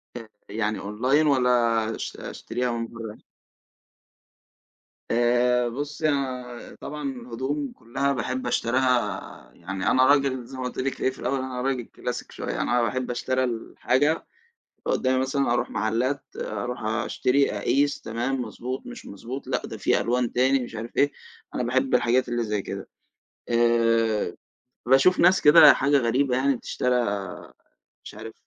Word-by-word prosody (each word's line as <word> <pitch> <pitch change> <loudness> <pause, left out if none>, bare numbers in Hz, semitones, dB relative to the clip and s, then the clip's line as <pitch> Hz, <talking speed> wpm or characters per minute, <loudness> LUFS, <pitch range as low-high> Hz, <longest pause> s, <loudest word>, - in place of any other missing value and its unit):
آآ، 120 - -6 0.3
يعني 105 0 -1
أونلاين 130 +9 +1
والّا 130 -3 +3 0.5
أش - - -6
أشتريها 125 +1 -3
من 115 0 -3
برّه؟ 115 -2 -8 1.9
آآ، 120 +1 +3
بُصّي 145 +5 -2
أنا 125 -4 -4
طبعًا 150 -2 -4
الهدوم 130 +3 -4
كلّها 135 +5 -2
باحب 130 0 -3
أشتريها 120 -2 0
يعني 95 +2 -2
أنا 130 0 +5
راجل 135 -3 +2
زي 130 - -10
ما 130 - -4
قُلت 125 - -5
لِك 135 +1 -2
إيه - - +3
في 130 - -10
الأوّل 135 - -1
أنا 130 -1 -4
راجل 130 -2 -1
كلاسيك - - -6
شويّة، - - -4
أنا 120 0 +2
باحب 125 +2 -1
أشترى 130 +1 0
الحاجة 130 +5 0 0.6
تبقى - - 0
قدّامي، 130 0 +1
مثلًا 135 -1 0
أروح 120 0 0
محلات، 115 +6 -1
أروح 120 +3 -4
أشتري، 120 +5 +1
أقيس، 140 +8 +1
تمام، 120 +4 -2
مضبوط، 125 - -6
مش 245 -1 -9
مضبوط، 120 +7 -7
لأ - - -1
ده - - -7
في - - +2
ألوان 125 0 0
تاني، 130 +2 +3
مش 120 - -10
عارف 115 +2 -7
إيه، 145 0 +3 0.4
أنا - - -1
باحب 130 +2 +1
الحاجات 125 +1 +2
اللي 120 0 -1
زي 105 -2 -2 0.7
كده.آآ، 115 -2 +1 0.5
باشوف 135 +9 +5
ناس 180 +2 +5
كده 150 0 +9
حاجة 140 +1 +3
غريبة 125 +1 +1
يعني 135 +1 +2
بتشترى 125 +1 -1 1.1
مش - - -10
عارف - - -8
125 Hz, 145 wpm, -25 LUFS, 115-135 Hz, 1.9 s, كده